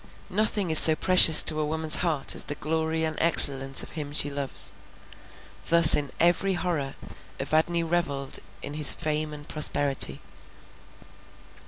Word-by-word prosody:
Nothing 205 -3 -3
is 155 - +9
so 160 - +7
precious 180 -2 +5
to 155 -1 -2
a - - -3
woman's 160 0 0
heart 155 -6 -2
as - - -3
the 145 - -7
glory 160 +1 -5
and 160 -1 -5
excellence 135 -5 +2
of - - -13
him 145 -3 -9
she 145 -1 -1
loves; 140 -1 -4 0.9
thus 170 -2 +6
in 145 -2 -3
every 175 +3 -1
horror 160 -6 -6 0.4
Evadne 170 +2 -3
revelled 155 -5 -4 0.2
in 145 - -9
his 150 -1 +4
fame 155 -1 -6
and 150 -1 -13
prosperity. 140 - 0
155 Hz, 145 wpm, -23 LUFS, 145-170 Hz, 0.9 s, is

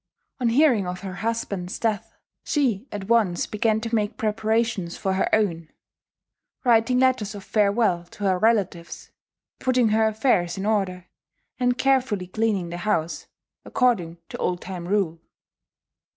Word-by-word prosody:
On 245 -2 +2
hearing 240 -6 +3
of 180 0 -5
her 190 -2 -6
husband's 200 -3 -3
death, 215 -3 -2 0.3
she 255 -6 0
at 200 -2 -6
once 215 -7 +2
began 215 +1 0
to 230 0 -5
make 210 -2 0
preparations 220 -4 -1
for 190 - -1
her 190 - +1
own, 170 -7 +1 0.9
writing 240 0 +3
letters 255 -5 +2
of 200 - -8
farewell 205 -4 +1
to 205 +4 -11
her 190 -2 +2
relatives, 195 -6 0 0.5
putting 250 -3 +2
her 220 +1 +3
affairs 215 -6 +1
in 195 - -3
order, 190 -4 0 0.5
and 245 0 +1
carefully 260 -8 +1
cleaning 200 -2 -1
the 175 - -5
house, 175 -3 -1 0.4
according 185 -10 +1
to - - -7
old 180 -1 -1
time 180 -2 -6
rule. 180 -5 0
210 Hz, 140 wpm, -24 LUFS, 180-230 Hz, 0.9 s, hearing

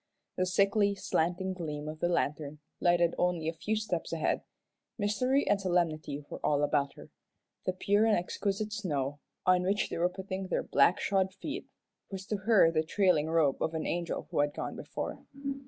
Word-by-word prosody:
The 185 - 0
sickly, 200 +2 +3
slanting 180 +1 0
gleam 150 -4 -5
of 155 0 -6
the 175 - +1
lantern 150 -3 -1 0.2
lighted 175 -1 +3
only 175 -3 +1
a 165 - 0
few 215 +6 -2
steps 210 -6 -2
ahead. 165 -2 0 0.6
Mystery 250 +6 +1
and 205 -1 +3
solemnity 160 -6 0
were - - -8
all 145 -1 +2
about 145 -1 +1
her; - - -13 0.6
the 185 - +2
pure 205 +3 +2
and 220 - +4
exquisite 200 +4 -2
snow, 145 -9 -2 0.3
on 185 0 +5
which 195 +3 0
they - - -3
were 175 +1 +3
putting 190 0 -5
their - - 0
black 185 - +4
shod 190 -1 +1
feet, 305 - -5 0.4
was 190 -1 -6
to 210 0 -2
her 195 -4 +5
the 155 -1 +2
trailing 165 -2 +2
robe 160 -4 +2
of 160 - 0
an 160 - -2
angel 170 -1 -2
who - - 0
had 145 0 +1
gone - - -4
before. - - -5
180 Hz, 180 wpm, -31 LUFS, 160-200 Hz, 0.6 s, on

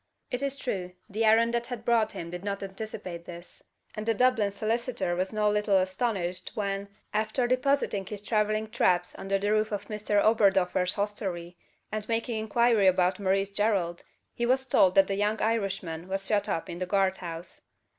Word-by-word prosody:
It 250 - -2
is 280 0 -1
true, 185 -9 -4
the 215 +1 -2
errand 230 +2 +4
that 235 0 -1
had 240 -3 -6
brought 225 -2 +2
him 170 0 -6
did 180 +1 -6
not 200 -1 -3
anticipate 190 -3 -7
this; 175 0 -10 0.3
and 215 - -5
the 225 0 +1
Dublin 250 -3 +3
solicitor 220 -2 -1
was 185 +2 -1
no 215 -1 +1
little 210 -1 +3
astonished 185 -2 -1
when, 200 -1 -2 0.3
after 215 +4 0
depositing 255 -6 +1
his 210 0 -6
travelling 215 0 0
traps 180 -3 +2
under 195 0 0
the 205 +1 -1
roof 215 0 +2
of 205 - -4
Mr 210 -1 0
Oberdoffer's 195 -4 +3
hostelry, 190 -4 -3 0.4
and 215 0 -4
making 230 0 -1
inquiry 220 -1 +3
about 185 0 +3
Maurice 195 0 +1
Gerald, 200 -5 0 0.3
he 240 - -1
was 265 +1 +2
told 190 -7 +4
that 195 - +7
the 195 - -2
young 210 +2 0
Irishman 190 -7 -1
was 195 +1 -2
shut 205 0 +1
up 165 - -2
in 170 0 -6
the 185 - -2
guard 190 0 +2
house. 170 -1 -8
205 Hz, 180 wpm, -28 LUFS, 185-220 Hz, 0.4 s, that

